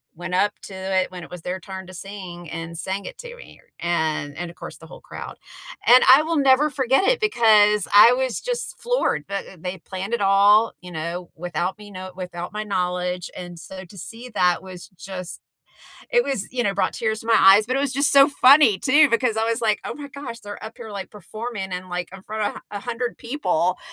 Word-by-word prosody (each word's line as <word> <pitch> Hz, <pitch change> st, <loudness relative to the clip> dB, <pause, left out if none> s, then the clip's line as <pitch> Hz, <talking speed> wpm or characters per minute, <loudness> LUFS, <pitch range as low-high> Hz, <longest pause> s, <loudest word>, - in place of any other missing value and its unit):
went 175 Hz, +2 st, -4 dB
up 205 Hz, +2 st, +2 dB
to 195 Hz, -, -9 dB
it 190 Hz, 0 st, -1 dB
when 180 Hz, -1 st, -8 dB
it -, -, -11 dB
was 180 Hz, -1 st, -8 dB
their 180 Hz, +3 st, -4 dB
turn 190 Hz, 0 st, -8 dB
to 185 Hz, -, -11 dB
sing 180 Hz, -3 st, -8 dB
and 165 Hz, 0 st, -6 dB
sang 190 Hz, +3 st, -4 dB
it -, -, -8 dB
to 485 Hz, -1 st, -9 dB
me -, -, -15 dB, 0.2 s
and 155 Hz, -4 st, -1 dB
and, 175 Hz, +1 st, -5 dB
of -, -, -19 dB
course, -, -, -9 dB
the -, -, -14 dB
whole -, -, -13 dB
crowd, -, -, -9 dB, 0.5 s
and 250 Hz, +1 st, +8 dB
I 285 Hz, -, +4 dB
will 325 Hz, +1 st, -1 dB
never 275 Hz, +1 st, +4 dB
forget 270 Hz, +1 st, +1 dB
it -, -, +3 dB
because 215 Hz, -, +4 dB
I 210 Hz, +4 st, +9 dB
was 260 Hz, -1 st, -1 dB
just -, -, -4 dB
floored, 480 Hz, -, 0 dB
but, 200 Hz, 0 st, -3 dB
eh, 190 Hz, -, -13 dB
they 180 Hz, +2 st, -5 dB
planned 190 Hz, +5 st, -6 dB
it 235 Hz, -, 0 dB
all, 200 Hz, +3 st, +5 dB
you 180 Hz, 0 st, -10 dB
know, 170 Hz, +2 st, -5 dB
without 175 Hz, +2 st, -3 dB
me 210 Hz, -1 st, -11 dB
know 185 Hz, -1 st, -8 dB
without 180 Hz, 0 st, -7 dB
my 210 Hz, 0 st, -3 dB
knowledge, 180 Hz, -2 st, -2 dB
and 175 Hz, -1 st, -8 dB
so 190 Hz, +2 st, -9 dB
to 195 Hz, +3 st, -15 dB
see 235 Hz, +7 st, -9 dB
that 180 Hz, -3 st, +2 dB
was 185 Hz, -2 st, -10 dB
just 185 Hz, -1 st, -8 dB, 0.7 s
it 485 Hz, -1 st, +3 dB
was 255 Hz, -7 st, -3 dB
you 250 Hz, -1 st, -1 dB
know, 200 Hz, -1 st, 0 dB
brought 200 Hz, -, 0 dB
tears 220 Hz, -1 st, -2 dB
to -, -, -11 dB
my 225 Hz, -, +5 dB
eyes, 195 Hz, +3 st, +7 dB
but 255 Hz, +2 st, -1 dB
it -, -, +1 dB
was 280 Hz, -1 st, 0 dB
just 280 Hz, +2 st, +2 dB
so 275 Hz, 0 st, +8 dB
funny 275 Hz, -5 st, +6 dB
too 290 Hz, +3 st, +5 dB
because 230 Hz, -2 st, +1 dB
I 220 Hz, -, +1 dB
was 230 Hz, 0 st, 0 dB
like, 215 Hz, -2 st, +1 dB
"Oh -, -, -4 dB
my 290 Hz, -1 st, -8 dB
gosh, 260 Hz, -4 st, -8 dB
they're 205 Hz, 0 st, -9 dB
up 220 Hz, +1 st, -9 dB
here, 230 Hz, -3 st, -9 dB
like, 200 Hz, -2 st, -6 dB
performing 210 Hz, 0 st, -6 dB
and, 180 Hz, +1 st, -5 dB
like, 180 Hz, -1 st, -4 dB
in 195 Hz, -1 st, -11 dB
front 215 Hz, 0 st, -3 dB
of -, -, -10 dB
100 235 Hz, +4 st, -4 dB
people 185 Hz, -, -1 dB
200 Hz, 225 wpm, -22 LUFS, 180-245 Hz, 0.7 s, I